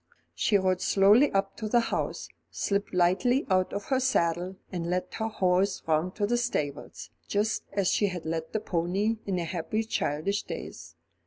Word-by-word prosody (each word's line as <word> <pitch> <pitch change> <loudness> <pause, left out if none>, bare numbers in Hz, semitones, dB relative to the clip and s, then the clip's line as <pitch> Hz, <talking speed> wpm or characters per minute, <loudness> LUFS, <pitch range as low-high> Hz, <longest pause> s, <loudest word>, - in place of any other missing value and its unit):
She 205 - +2
rode 185 -1 +1
slowly 205 +8 +5
up 195 0 0
to 215 -2 -4
the 240 - +4
house, 230 - -2 0.2
slipped 200 0 -1
lightly 185 +9 +2
out 185 -1 +2
of 200 0 -4
her 265 -2 +3
saddle, 180 -7 0 0.2
and 170 -2 -3
led 180 +1 -2
her 220 - 0
horse 190 -2 +1
round 160 +3 0
to 205 - 0
the 240 +3 +1
stables, 150 - -3 0.2
just 210 +2 0
as 195 -2 +1
she 205 - +2
had 180 -4 -5
led 160 0 -3
the 215 - -1
pony 195 +6 0
in 190 -2 0
her 170 - -1
happy 180 +6 -2
childish 200 -1 -1
days. - - -8
195 Hz, 175 wpm, -28 LUFS, 175-215 Hz, 0.2 s, slowly